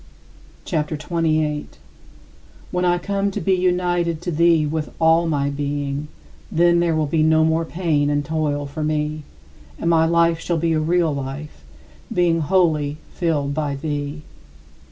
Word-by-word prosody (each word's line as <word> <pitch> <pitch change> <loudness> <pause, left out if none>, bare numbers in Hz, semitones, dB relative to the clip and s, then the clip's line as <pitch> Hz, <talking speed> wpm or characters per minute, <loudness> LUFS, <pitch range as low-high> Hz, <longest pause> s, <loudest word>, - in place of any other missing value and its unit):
CHAPTER 155 -3 -1
XXVIII 155 +3 -5
39. 155 -2 +1 1.0
When 180 0 0
I 175 0 +3
come 200 +2 -1
to 195 - -4
be 190 +3 +1
united 175 -2 +1
to 175 - -2
thee 165 -1 +3
with 150 0 -2
all 165 +1 +3
my 145 -3 0
being, 145 0 -3 0.4
then 170 +1 +4
there 170 -2 +1
will 155 -1 +1
be 155 +2 0
no 160 0 +4
more 160 +1 +1
pain 160 -4 0
and 145 0 0
toil 150 -1 -1
for 145 +2 -5
me, 150 0 -1 0.6
and 170 - 0
my 160 -1 +4
life 170 0 +3
shall 170 0 -1
be 165 +1 +1
a 155 - +2
real 165 0 +1
life, 140 - -6 0.5
being 170 -2 +2
wholly 155 -4 +1 0.2
filled 150 -5 -1
by 145 -2 -2
thee. 145 +1 -4
160 Hz, 155 wpm, -21 LUFS, 150-170 Hz, 1.0 s, then